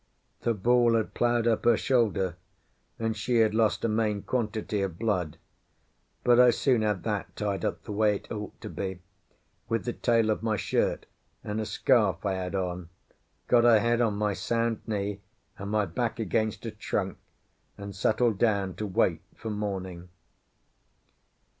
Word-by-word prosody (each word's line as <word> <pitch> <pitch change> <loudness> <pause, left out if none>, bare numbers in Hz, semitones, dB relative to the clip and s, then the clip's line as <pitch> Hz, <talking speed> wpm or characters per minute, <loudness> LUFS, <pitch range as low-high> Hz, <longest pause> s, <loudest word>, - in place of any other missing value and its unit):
The 115 - +1
ball 120 +3 +3
had 110 -2 -1
ploughed 120 -1 +1
up 115 -2 +2
her 120 -2 +5
shoulder, 105 -8 +1 0.6
and 115 -1 -1
she 115 +3 -1
had 110 -2 +4
lost 110 0 +2
a - - +3
main 105 -2 0
quantity 110 -4 -2
of 95 -4 -3
blood; 90 -8 -1 0.9
but 120 0 +5
I 125 0 +8
soon 125 -1 +2
had 105 -4 0
that 105 -3 -3
tied 100 -2 -2
up - - -2
the 110 - -7
way 105 0 +2
it - - -9
ought 105 -1 -6
to - - -6
be 95 -2 -5 0.7
with 115 0 -1
the 120 - -2
tail 115 -2 +2
of 105 - -1
my 110 -1 0
shirt - - 0 0.4
and 105 +1 -3
a 110 - -4
scarf 105 -1 +2
I 100 - +1
had 95 0 -3
on, 90 -2 -3 0.6
got 120 -1 +5
her 115 -2 +6
head 120 +2 +2
on 110 -3 +1
my 105 0 0
sound 115 +2 -1
knee 100 -2 -2 0.4
and 100 +1 -5
my 105 0 +1
back 115 +7 -2
against 110 +1 -1
a 115 - -3
trunk, 100 -3 -3 0.6
and 100 -1 -8
settled 110 +1 +1
down 100 -5 +1
to 105 - -3
wait 95 - +1
for 110 - -6
morning. 95 -4 -4
105 Hz, 170 wpm, -28 LUFS, 100-115 Hz, 0.9 s, I